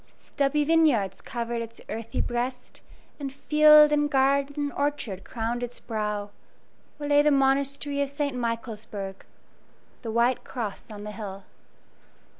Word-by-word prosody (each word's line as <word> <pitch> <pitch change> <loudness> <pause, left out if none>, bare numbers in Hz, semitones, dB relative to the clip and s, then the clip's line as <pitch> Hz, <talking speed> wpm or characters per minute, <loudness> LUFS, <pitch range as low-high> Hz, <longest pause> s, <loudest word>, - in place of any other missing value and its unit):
Stubby 285 +1 0
vineyards 285 - +2
covered 235 0 -3
its 230 0 -8
earthy 225 +1 -3
breast, 250 +1 -4 0.4
and 275 -2 -4
field 300 +2 +6
and 295 0 +2
garden 275 0 +2
and 290 -1 -2
orchard 280 -10 -2
crowned 235 +1 -3
its 245 0 -5
brow, 210 -2 -3 0.7
where 295 -1 -5
lay 290 0 +5
the 300 - +4
Monastery 280 +1 +1
of 280 - 0
St. 285 -1 -2
Michaelsburg 220 -5 -4 0.8
"The 230 - -5
White 235 +3 +2
Cross 230 -3 -6
on 205 -1 -8
the 210 - -6
Hill." 200 -3 -7
250 Hz, 135 wpm, -26 LUFS, 225-285 Hz, 0.8 s, field